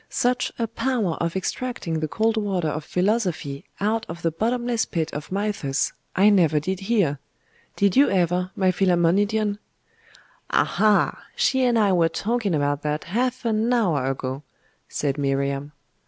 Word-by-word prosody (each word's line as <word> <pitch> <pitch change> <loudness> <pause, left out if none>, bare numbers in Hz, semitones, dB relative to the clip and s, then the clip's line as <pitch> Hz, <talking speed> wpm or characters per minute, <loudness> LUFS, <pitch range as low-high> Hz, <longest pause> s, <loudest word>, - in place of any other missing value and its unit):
'Such 250 0 0
a 230 - 0
power 230 -4 -1
of 170 +1 -1
extracting 190 -4 -3
the 155 - -1
cold 220 +7 +1
water 195 -6 -1
of 155 +1 -4
philosophy 180 -7 -1
out 220 +3 0
of 170 +1 -7
the 165 - +1
bottomless 235 +6 0
pit 160 -2 -3
of 150 +3 -6
Mythus, 195 -9 -1 0.2
I 200 +3 +5
never 165 -6 +4
did 185 +5 -3
hear. 195 -9 +1 0.6
Did 200 -2 +2
you 280 +2 +6
ever, 180 -1 +1
my 185 -1 +2
Philammonidion?' 200 +4 +2 0.9
'Aha! 215 -1 +2
she 265 -1 +2
and 240 -2 +3
I 210 -3 +3
were 170 -3 +3
talking 215 -3 -1
about 145 0 0
that 150 +1 -2
half 245 +7 -2
an 225 +1 +1
hour 170 - +2
ago,' 130 0 -4 0.5
said 145 -1 -2
Miriam. 140 +1 -1
190 Hz, 150 wpm, -24 LUFS, 155-220 Hz, 0.9 s, you